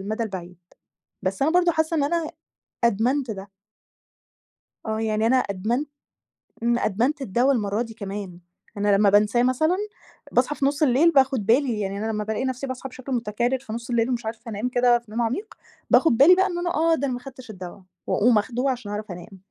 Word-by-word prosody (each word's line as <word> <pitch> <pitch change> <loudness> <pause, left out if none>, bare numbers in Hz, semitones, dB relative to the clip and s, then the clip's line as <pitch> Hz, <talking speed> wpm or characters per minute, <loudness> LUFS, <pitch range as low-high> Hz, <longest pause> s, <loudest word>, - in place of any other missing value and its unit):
المدى 215 +4 -3
البعيد. 180 -5 -6 0.6
بس 190 +1 -3
أنا 295 +4 +3
برضه 350 0 +4
حاسة 320 +1 0
إن 285 - +2
أنا 330 +1 -1 0.5
أدمنت 235 +3 +1
ده. 195 -1 -8 1.4
آه 220 0 -2
يعني 220 0 0
أنا 255 +3 +4
أدمنت 235 +5 -1 0.8
امم، 235 0 +2
أدمنت 250 - 0
الدوا 250 +4 +2
المرّة 210 -1 -1
دي 230 -2 -5
كمان، 200 -4 -7 0.4
أنا 205 0 +3
لمّا 200 0 +4
بانساه 210 +4 +3
مثلًا، 315 +8 +2 0.5
باصحى 260 +4 +1
في 275 - -1
نص 285 +2 +1
الليل 285 +5 +4
باخد 265 -6 +2
بالي، 240 0 +2
يعني 195 -1 -3
أنا 220 +2 -2
لمّا 210 -1 -2
بالاقي 220 +4 -2
نفسي 260 +1 -3
باصحى 260 +1 -6
بشكل 260 +1 -9
متكرر 240 +2 -1
في 240 -5 -8
نص 235 +1 -6
الليل 235 0 +1
ومش 240 -2 -2
عارفة 230 +1 -6
أنام 215 +4 -2
كده 245 -1 +3
في 235 -3 -20
نوم 230 +2 -1
عميق 265 - -2 0.4
باخد 285 -9 +4
بالي 310 +8 +8
بقى 380 +1 +3
إن 350 -2 -4
أنا 350 - -1
آه 325 +1 +3
ده 280 -2 -2
أنا 260 - -2
ما - - -6
أخدتش 255 -3 -11
الدوا، 185 -1 -9 0.3
وأقوم 225 +1 +3
آخده 250 +5 0
عشان 245 -5 -4
أعرف 210 -1 -5
أنام. 180 +2 -10
240 Hz, 195 wpm, -24 LUFS, 210-270 Hz, 1.4 s, بالي